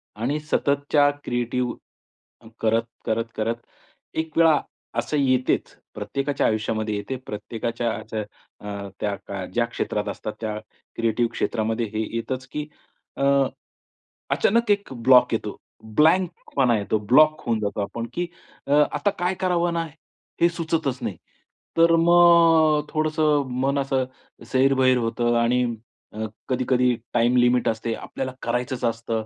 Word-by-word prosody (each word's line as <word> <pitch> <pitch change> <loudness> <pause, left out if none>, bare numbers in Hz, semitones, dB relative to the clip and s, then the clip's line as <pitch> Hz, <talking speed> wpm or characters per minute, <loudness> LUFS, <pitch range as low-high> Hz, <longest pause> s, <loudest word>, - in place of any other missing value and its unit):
आणि 130 +8 -1
सततच्या 145 -1 +2
क्रिएटिव्ह, 120 0 -1 0.7
अन 110 - -14
करत, 115 +1 +2 0.2
करत, 115 0 0
करत 115 +2 -1 0.6
एक 160 0 -3
वेळा 165 -2 +6 0.4
असं 150 - -1
येतेच 130 -2 +1 0.2
प्रत्येकाच्या 135 +7 -2
आयुष्यामध्ये 110 0 -1
येते. 100 +6 -4
प्रत्येकाच्या 115 +2 -3
असं 110 -1 -4 0.4
अ, 100 -1 -6
त्या 100 -2 -4
ज्या 120 0 +2
क्षेत्रात 105 -2 -3
असतात 105 +1 -5
त्या 110 -1 -3 0.4
क्रिएटिव्ह 115 +1 +1
क्षेत्रामध्ये 115 +1 -1
हे 110 +1 0
येतच, 125 +3 -3
की 150 0 -5 0.5
अ, - - -1 1.1
अचानक 230 +1 +2
एक 200 -8 0
ब्लॉक 125 +1 +5
येतो. - - -2 0.4
ब्लँकपणा 160 -7 +2
येतो. 105 +1 0
ब्लॉक 155 +9 +4
होऊन 115 -2 +1
जातो 105 0 -2
आपण, 115 +3 -4
की 175 0 -2 0.4
अ, - - -3 0.2
आता 205 - +1
काय 180 +1 +1
करावं 175 -2 +1
ना, 165 0 -1 0.6
हे 170 - +6
सुचतच 160 -6 -2
नाही. 105 -7 -4 0.6
तर 165 0 +6
मग 165 -3 +6
थोडंसं 155 -2 +1 0.2
मन 140 +1 +1
असं 135 -1 0 0.5
सैरभर 130 -1 +4
होतं 120 0 0
आणि 125 +2 +2 0.5
अ, 110 +1 -3 0.2
कधी-कधी 125 -1 +2 0.2
टाईम 120 +1 +3
लिमिट 125 0 +3
असते. 115 +1 -2
आपल्याला 130 -1 -5
करायचंच 125 +1 -2
असतं. 115 -1 -2
125 Hz, 130 wpm, -24 LUFS, 115-150 Hz, 1.1 s, वेळा